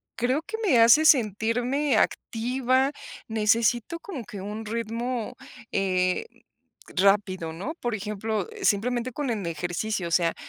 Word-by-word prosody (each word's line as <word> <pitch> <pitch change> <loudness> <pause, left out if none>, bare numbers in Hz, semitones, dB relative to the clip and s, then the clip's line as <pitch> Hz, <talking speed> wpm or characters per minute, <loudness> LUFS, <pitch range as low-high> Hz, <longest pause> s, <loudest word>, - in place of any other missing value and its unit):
creo 255 +5 0
que 445 +6 -6
me 260 -10 +5
hace 235 +8 +7
sentirme 245 - +2
activa, 255 +5 +1 0.4
necesito 225 +7 +1
como 315 -11 -7
que 200 -1 -8
un 210 +3 -6
ritmo, 230 +1 -3 0.4
eh, 185 - +1 0.7
rápido, 190 -3 +2
¿no? 190 - -5
Por 240 -2 -1
ejemplo, 210 +2 -3
simplemente 240 - +1
con 275 0 -2
el 215 -4 -2
ejercicio, 175 +4 -2
o - - -7
sea, 165 0 +2
225 Hz, 125 wpm, -26 LUFS, 200-250 Hz, 0.7 s, hace